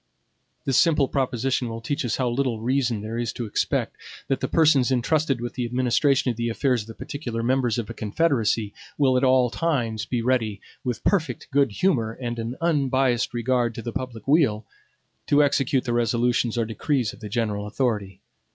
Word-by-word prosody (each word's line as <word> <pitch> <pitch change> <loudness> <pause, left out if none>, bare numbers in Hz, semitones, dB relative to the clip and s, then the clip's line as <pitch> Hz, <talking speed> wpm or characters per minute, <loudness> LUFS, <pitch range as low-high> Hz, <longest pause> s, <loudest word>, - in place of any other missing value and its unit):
This 135 - +3
simple 155 -5 +3
proposition 130 -2 -1
will 115 0 -5
teach 140 +6 -2
us 120 - -1
how 130 - 0
little 120 -2 -1
reason 120 -2 0
there 110 +2 -4
is 120 -2 -1
to 120 - -4
expect, 105 - -1 0.3
that 135 - +1
the 130 - -1
persons 150 -5 +4
intrusted 135 +2 +1
with 120 0 -5
the 125 - -3
administration 130 +2 +2
of 115 - -7
the 120 0 -1
affairs 125 +1 +1
of 105 - -11
the 115 - -9
particular 120 -6 -5
members 125 -2 +1
of 115 -3 -3
a 115 - -6
confederacy 110 -3 0 0.2
will 135 -3 +3
at 125 - +2
all 130 -2 +4
times 120 -10 -1
be 120 -2 -1
ready, 115 -5 0 0.2
with 125 -3 -3
perfect 155 - 0
good 140 -3 +3
humor, 115 - +1
and 120 -1 -5
an 115 +2 -4
unbiased 135 -6 +1
regard 120 0 0
to 115 - -6
the 115 - -5
public 130 -4 -6
weal, 135 -8 +3 0.6
to 145 0 +5
execute 135 -2 +1
the 120 - -2
resolutions 120 0 +1
or 115 - +1
decrees 115 +1 -1
of - - -14
the 105 -2 -7
general 105 -2 -1
authority. 105 -5 -2
125 Hz, 190 wpm, -24 LUFS, 115-135 Hz, 0.6 s, to